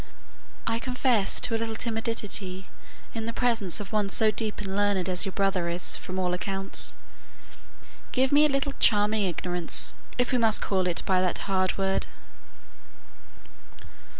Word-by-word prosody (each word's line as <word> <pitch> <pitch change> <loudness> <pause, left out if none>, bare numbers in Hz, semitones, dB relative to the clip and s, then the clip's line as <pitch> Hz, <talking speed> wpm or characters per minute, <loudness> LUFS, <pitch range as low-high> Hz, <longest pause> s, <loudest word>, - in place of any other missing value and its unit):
I 230 0 0
confess 250 -4 +1
to 230 - 0
a - - -1
little 225 -1 -3
timidity 220 -5 -2 0.5
in 225 -1 -4
the 230 - -3
presence 230 -8 +1
of 205 - -7
one 210 -2 0
so 215 +2 +4
deep 215 -1 -2
and 195 -2 -4
learned 205 -2 +1
as 180 +1 +1
your - - -3
brother 190 -3 0
is 175 +1 0
from 185 0 -6
all 180 -1 0
accounts. 195 +1 0 1.2
Give 260 0 +1
me 295 +1 +6
a - - -3
little 275 0 -1
charming 210 0 +3
ignorance, 175 -1 0 0.2
if 245 -1 +1
we 250 - +2
must 225 -2 +4
call 190 -2 0
it 175 - +1
by 185 -1 +2
that 180 -1 +1
hard 185 -2 0
word." 195 0 0
205 Hz, 155 wpm, -26 LUFS, 185-230 Hz, 1.2 s, me